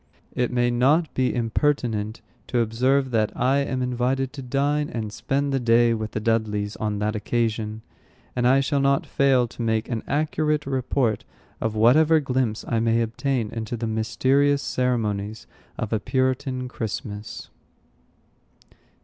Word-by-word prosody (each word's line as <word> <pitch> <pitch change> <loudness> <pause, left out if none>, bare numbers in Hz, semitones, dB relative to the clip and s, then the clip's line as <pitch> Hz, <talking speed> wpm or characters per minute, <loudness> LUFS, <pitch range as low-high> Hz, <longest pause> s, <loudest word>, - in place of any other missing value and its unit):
It 125 -1 0
may 120 -1 +2
not 145 +7 +2
be 130 -1 +1
impertinent 115 -3 0 0.3
to 125 - -1
observe, 130 +4 +1
that 110 -2 +1
I 130 +3 +3
am 130 -2 -1
invited 125 +2 -1
to 140 - -7
dine 140 +3 0
and 110 -3 -4
spend 140 +3 -1
the 135 - +2
day 120 -1 +4
with 110 -1 -4
the - - -1
Dudleys 105 -2 -1
on 105 -1 -2
that 105 +1 -1
occasion, 110 -1 -2 0.5
and 125 0 +2
I 135 +2 +5
shall 140 +1 0
not 140 0 +2
fail 130 -3 +2
to 120 - -9
make 110 -1 0
an 115 -3 -2
accurate 150 0 0
report 130 -4 0 0.4
of 110 -1 -1
whatever 150 +9 +5
glimpse 130 -6 -1
I 115 - +1
may 115 0 +2
obtain 115 0 -2
into 115 +1 -4
the 115 - -3
mysterious 135 +6 +1
ceremonies 110 -4 -1 0.3
of 115 -2 -3
a 110 - +1
Puritan 130 +1 -1
Christmas. 110 -2 -6
120 Hz, 150 wpm, -24 LUFS, 110-135 Hz, 0.5 s, I